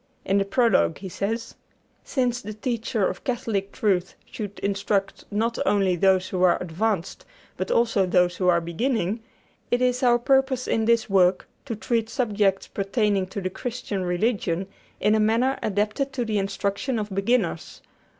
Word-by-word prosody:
In 195 +1 +2
the 195 - +1
prologue 230 -5 +2
he 190 - -7
says: 225 +5 -3 0.5
"Since 245 -3 -1
the 210 +1 -7
teacher 225 -1 -1
of - - -5
Catholic 225 -6 -2
truth 190 -6 0
should 205 -2 -7
instruct 200 0 -1
not 225 +3 -1
only 195 -2 +2
those 185 +1 +3
who 185 - -2
are 180 -1 +4
advanced, 180 +2 -2 0.3
but 185 - -3
also 225 -5 +2
those 180 0 +2
who 185 - 0
are 175 -1 +5
beginning, 200 +4 -1 0.5
it 245 - +2
is 250 0 +1
our 240 -2 +5
purpose 265 +1 +2
in 225 - +1
this 230 0 +3
work 185 -2 +3 0.2
to 235 -5 -4
treat 225 +1 -1
subjects 210 -5 +1
pertaining 200 -1 0
to 200 +2 -5
the 185 0 -3
Christian 230 -3 -4
religion 180 -1 0 0.3
in 210 +1 +3
a 220 - +3
manner 230 +5 +2
adapted 215 +7 -1
to 250 -3 -2
the 215 -2 0
instruction 200 +5 -2
of 210 -1 -3
beginners. 195 -4 -1
210 Hz, 160 wpm, -24 LUFS, 190-235 Hz, 0.5 s, are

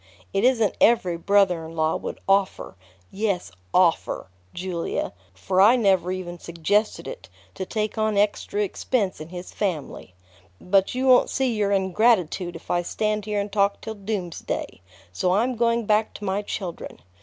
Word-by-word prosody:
It 195 - +1
isn't 235 -5 +3
every 190 -7 +4
brother 180 -1 +2
in 160 +1 -9
law 160 0 +1
would - - -5
offer 195 - +1 0.4
yes, 195 - -2 0.2
offer, 170 - +1 0.2
Julia, 175 -2 -3 0.2
for 185 - 0
I 220 +5 +7
never 190 -6 +2
even 175 -2 -5
suggested 170 +6 -1
it - - -8 0.2
to 190 - -5
take 215 0 -2
on 215 -1 +1
extra 205 0 +1
expense 200 -2 -1
in 155 - -8
his 180 0 -8
family. 155 - -4 0.4
But 195 +4 +2
you 260 +1 0
won't 255 -1 +6
see 265 -3 0
your 205 -2 0
ingratitude 190 -2 +2
if 165 - -8
I 175 - +2
stand 210 +3 -2
here 210 -1 -1
and 200 0 -3
talk 200 0 +2
till 220 - -6
doomsday; 195 - -4 0.3
so 180 - +1
I'm 245 +5 +1
going 230 0 +1
back 215 +1 +1
to 205 - -7
my 195 +1 0
children. 190 -4 -6
200 Hz, 160 wpm, -24 LUFS, 180-215 Hz, 0.4 s, I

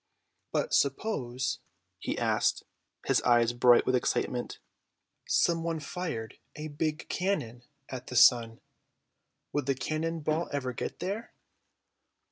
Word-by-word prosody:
"But - - -1
suppose," 135 - 0 0.4
he - - -3
asked, - - +1 0.4
his - - +3
eyes 120 -1 +4
bright 120 0 +5
with 130 - +2
excitement, 125 0 -1 0.7
"someone 165 -1 +1
fired 150 -7 -5 0.2
a 155 +1 -6
big 155 +1 -2
cannon 150 - -2 0.3
at 130 -2 -7
the 125 - -6
sun. 115 -2 +5 0.9
Would 145 -2 -1
the 135 - +2
cannon 160 +4 -2
ball 155 +3 0
ever 130 -3 -2
get - - -5
there?" 200 +6 -4
140 Hz, 115 wpm, -30 LUFS, 120-165 Hz, 0.9 s, bright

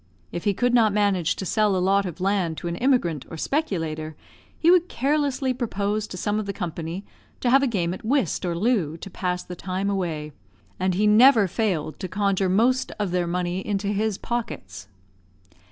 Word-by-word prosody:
If 175 - -5
he 200 -2 +2
could 245 +3 +1
not 225 -4 +4
manage 195 -5 +1
to 190 - -5
sell 210 +1 +2
a - - +1
lot 195 +2 +2
of 175 0 -7
land 185 -4 0
to - - -5
an 170 - -2
immigrant 180 - +1
or 165 - -7
speculator, 160 - -2 0.4
he 335 - +4
would 360 -1 +4
carelessly 275 -1 0
propose 215 -3 -2
to 185 - -8
some 205 +4 -1
of 210 - -4
the 200 - -2
company 170 0 -5 0.3
to 245 - +1
have 270 +1 +6
a 275 - +2
game 180 -7 -1
at - - -9
whist 240 - 0
or 175 -2 -1
loo, 185 -7 +1
to 195 - -9
pass 180 -1 -2
the 180 - -8
time 185 +3 -2
away; 160 -6 -3 0.5
and 185 -1 +1
he 210 +3 +2
never 220 0 +6
failed 175 - -2
to 185 - -4
conjure 195 0 0
most 240 +7 +2
of 205 -4 -2
their 180 -1 0
money 180 +1 -1
into 200 0 -2
his 210 0 0
pockets. 120 - -5
195 Hz, 195 wpm, -24 LUFS, 175-220 Hz, 0.5 s, have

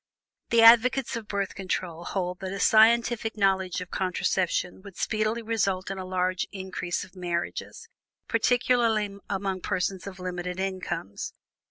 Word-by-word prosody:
The 230 -1 +5
advocates 240 +3 +6
of 225 -2 -6
Birth 200 -1 -2
Control 180 -3 -4
hold 180 -2 -2
that 190 -1 -5
a 195 - -4
scientific 225 +1 +4
knowledge 190 -2 +1
of 180 - -8
contraception 185 -1 -1
would 200 -2 -12
speedily 215 +2 -1
result 195 -4 0
in 195 - -5
a 185 - -5
large 185 0 -1
increase 190 -2 -4
of 185 - -15
marriages, 175 - -4 0.4
particularly 230 -5 +2
among 195 -1 -2
persons 185 0 -2
of 190 -1 -8
limited 180 0 -4
incomes. 185 - -4
190 Hz, 140 wpm, -27 LUFS, 185-220 Hz, 0.4 s, advocates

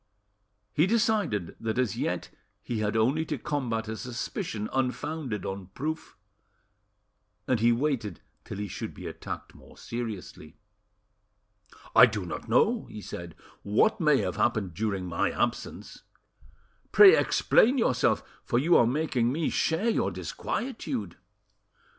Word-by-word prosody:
He 155 +5 +3
decided 210 - +1
that 110 +1 -2
as 125 -5 +1
yet - - -2 0.3
he 115 -3 -3
had 105 +1 0
only 130 +8 +2
to 150 -2 -3
combat 120 -5 -2
a 110 - -3
suspicion 115 - -4
unfounded 130 - -2
on 95 -1 -5
proof, 155 +3 -4 1.3
and 125 - +2
he 115 +2 +4
waited 120 -4 -1 0.2
till - - -7
he 105 0 -3
should - - -6
be - - -9
attacked - - -7
more - - -17
seriously. 115 -5 -6 1.4
"I 125 +2 +10
do 105 -5 -4
not 85 - -6
know," - - +3
he - - -9
said, 85 -4 -8 0.3
"what 110 - +2
may 150 -3 +5
have - - -3
happened 110 -7 +1
during 100 -1 -2
my 90 +3 0
absence; 120 -1 -3 0.9
pray 410 +1 +9
explain 255 - +3
yourself, 130 - +2 0.2
for 120 - 0
you 165 +7 +4
are 115 - +5
making 130 -3 +1
me 160 +3 -1
share 165 +8 +1
your 230 - +2
disquietude." 220 - -4
120 Hz, 135 wpm, -28 LUFS, 105-155 Hz, 1.4 s, I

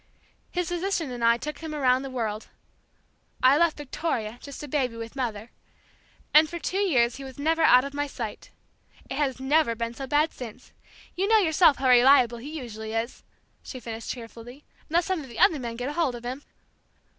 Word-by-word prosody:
His 355 -1 -2
physician 350 -4 -2
and 240 -1 -5
I 230 0 +5
took 300 +4 -6
him 315 -2 -6
around 260 -3 +3
the 270 - -6
world, 220 -4 -3 1.0
I 260 +2 +7
left 335 +1 +2
Victoria, 250 -6 -3
just 280 0 -9
a - - -6
baby, 255 -4 -1
with 230 +2 -7
mother, 230 -4 -4 0.8
and 310 +1 +7
for 345 - -5
too 370 +3 -2
years 255 -12 +2
he 275 - -8
was 265 -1 -10
never 325 +3 +1
out 255 -5 +6
of 280 - -6
my 290 0 -2
sight. 230 -6 -7 0.6
It - - -3
has 270 -3 0
never 265 -2 +2
been 230 0 -3
so 270 +2 -7
bad 295 +4 +2
since. 250 0 -10 0.4
You 380 +3 0
know 445 +1 +5
yourself 330 -5 +4
how 265 - 0
reliable 245 -1 +6
he 265 +5 -8
usually 220 -3 -7
is," 225 +2 -3 0.4
she 255 - -8
finished 230 -2 -7
cheerfully, 240 +3 -9 0.3
"unless 340 +2 +2
some 375 -4 -1
of 270 - -11
the 235 - -10
other 310 - +4
men 235 -2 -5
get 250 +4 -3
hold 295 -6 0
of 240 0 -9
him!" 255 +3 -4
265 Hz, 195 wpm, -26 LUFS, 235-305 Hz, 1.0 s, I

